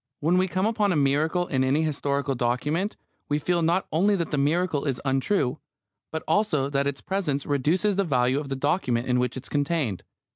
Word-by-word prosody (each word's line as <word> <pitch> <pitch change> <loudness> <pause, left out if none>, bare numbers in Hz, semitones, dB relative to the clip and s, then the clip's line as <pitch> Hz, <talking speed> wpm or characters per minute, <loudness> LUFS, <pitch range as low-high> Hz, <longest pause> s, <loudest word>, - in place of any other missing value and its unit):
When 170 +5 +2
we 185 - +2
come 185 +2 -1
upon 215 -2 +1
a - - +1
miracle 150 +5 +1
in 130 -6 0
any 140 +4 +2
historical 140 -2 -1
document 140 - -1 0.3
we 145 - +2
feel 170 +3 0
not 170 +3 +2
only 195 +6 +3
that 170 -4 -2
the 150 - 0
miracle 155 +1 +1
is 135 -4 -1
untrue, 135 +2 0 0.5
but 160 - -4
also 150 -10 +1
that 140 0 +1
its 140 -1 -3
presence 155 -8 -2
reduces 170 +9 +1
the 200 - +3
value 130 -4 +1
of 145 -2 -6
the 135 - -2
document 135 -4 0
in 125 -1 +1
which 125 0 -1
it 130 - -7
is - - -7
contained. 145 - -1
145 Hz, 205 wpm, -25 LUFS, 135-175 Hz, 0.5 s, only